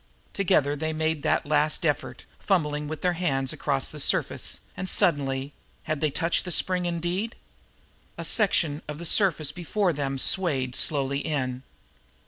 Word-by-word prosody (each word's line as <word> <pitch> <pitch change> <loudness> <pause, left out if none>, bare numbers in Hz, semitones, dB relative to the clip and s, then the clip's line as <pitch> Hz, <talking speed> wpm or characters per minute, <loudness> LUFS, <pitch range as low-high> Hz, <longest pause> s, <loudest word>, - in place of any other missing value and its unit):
Together 145 -7 +2
they 160 +2 -2
made 160 -1 -1
that - - +1
last 150 +2 +1
effort, 150 -2 -2
fumbling 150 -6 0
with 155 0 -6
their 180 -1 +2
hands 135 -7 -1
across - - -1
the - - -8
rough - - -2
surface, - - 0 0.2
and 185 - -2
suddenly 140 -3 +2 0.3
had 155 -2 -3
they 155 - +2
touched 165 +4 0
the 180 - -5
spring, 180 +1 +1
indeed? 175 +6 -2 0.8
a - - -4
section 170 -8 +2
of 150 -1 -5
the 170 - -7
surface 160 -6 +2
before 180 +3 -1
them 135 -2 -2
swayed 135 -5 +2
slowly 140 -2 0
in. 130 -5 -2
155 Hz, 155 wpm, -26 LUFS, 145-175 Hz, 0.8 s, Together